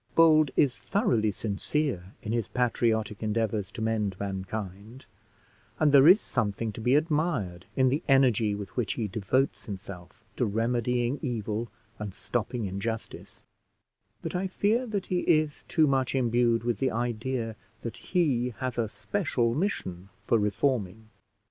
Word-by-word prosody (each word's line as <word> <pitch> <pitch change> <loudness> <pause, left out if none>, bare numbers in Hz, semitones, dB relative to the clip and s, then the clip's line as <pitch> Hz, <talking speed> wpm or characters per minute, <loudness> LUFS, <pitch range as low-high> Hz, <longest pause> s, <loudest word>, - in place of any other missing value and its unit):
Bold 155 -3 +6
is 130 -6 +2
thoroughly 120 - +1
sincere 100 -1 -2
in 110 - -3
his 115 -4 0
patriotic 115 -4 0
endeavours 110 -2 -1
to 110 - -4
mend 105 -4 -1
mankind, 100 +4 -5 0.7
and 155 -2 +4
there 140 +1 +7
is 185 +5 +9
something 110 - -2
to 110 - -8
be 125 +4 +3
admired 150 - 0
in 130 -1 +4
the 140 +5 0
energy 125 -7 +4
with 100 -3 -8
which 120 -4 0
he 110 -3 -2
devotes 110 +7 0
himself 100 +1 -9
to 125 - +2
remedying 120 +4 0
evil 115 -3 -2 0.3
and 105 -3 -5
stopping 120 -1 -2
injustice; 100 +4 -5 0.8
but - - -4
I 185 +2 -1
fear 220 +6 +1
that 205 -4 -2
he 180 - 0
is 155 -4 +1
too 160 - +3
much 135 -2 +1
imbued 120 -2 +2
with 120 -3 -1
the 135 - +2
idea 120 0 -2 0.3
that 115 - -6
he 125 - 0
has 125 -1 -3
a 110 -2 0
special 120 - -1
mission 100 - -3
for 115 +2 +2
reforming. 105 0 -1
115 Hz, 145 wpm, -28 LUFS, 105-135 Hz, 0.8 s, is